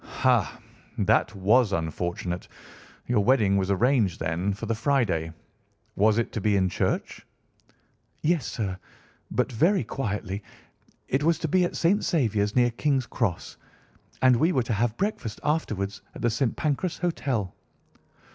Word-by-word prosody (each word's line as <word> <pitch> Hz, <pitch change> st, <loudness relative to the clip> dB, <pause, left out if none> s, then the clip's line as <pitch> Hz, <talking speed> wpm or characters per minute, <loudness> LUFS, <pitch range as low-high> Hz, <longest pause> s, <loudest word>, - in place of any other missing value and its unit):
"Ha! -, -, +1 dB, 0.4 s
that -, -, +2 dB
was 105 Hz, +4 st, +3 dB
unfortunate. 85 Hz, +1 st, -3 dB, 0.6 s
Your 120 Hz, -4 st, +2 dB
wedding 110 Hz, -5 st, +3 dB
was 95 Hz, -1 st, 0 dB
arranged, 110 Hz, -1 st, +2 dB
then, 85 Hz, +5 st, -1 dB
for 100 Hz, +3 st, -5 dB
the 115 Hz, -, 0 dB
Friday. 110 Hz, -, 0 dB, 0.6 s
Was 105 Hz, +2 st, +3 dB
it 115 Hz, -, 0 dB
to 110 Hz, -, -4 dB
be 105 Hz, 0 st, +2 dB
in 95 Hz, -1 st, +2 dB
church?" -, -, -2 dB, 1.0 s
"Yes, 155 Hz, -5 st, +1 dB
sir, 95 Hz, -5 st, -3 dB, 0.5 s
but 125 Hz, +1 st, 0 dB
very 170 Hz, -, +2 dB
quietly. 100 Hz, -5 st, -3 dB, 0.7 s
It 135 Hz, -, 0 dB
was 165 Hz, +1 st, +3 dB
to 160 Hz, -, -2 dB
be 180 Hz, +4 st, +3 dB
at -, -, -4 dB
St. 190 Hz, +5 st, +2 dB
Saviour's, 110 Hz, -, +1 dB
near 120 Hz, -1 st, +4 dB
King's 135 Hz, +1 st, 0 dB
Cross, 110 Hz, -8 st, -3 dB, 0.7 s
and 130 Hz, -1 st, +6 dB
we 160 Hz, +8 st, +3 dB
were 130 Hz, -7 st, +1 dB
to 115 Hz, -, -2 dB
have 115 Hz, +2 st, 0 dB
breakfast 190 Hz, -, -3 dB
afterwards 105 Hz, -10 st, -1 dB
at -, -, -8 dB
the 120 Hz, -, +3 dB
St. 115 Hz, +2 st, 0 dB
Pancras 155 Hz, +4 st, -1 dB
Hotel. 135 Hz, -, -2 dB
115 Hz, 145 wpm, -26 LUFS, 100-140 Hz, 1.0 s, and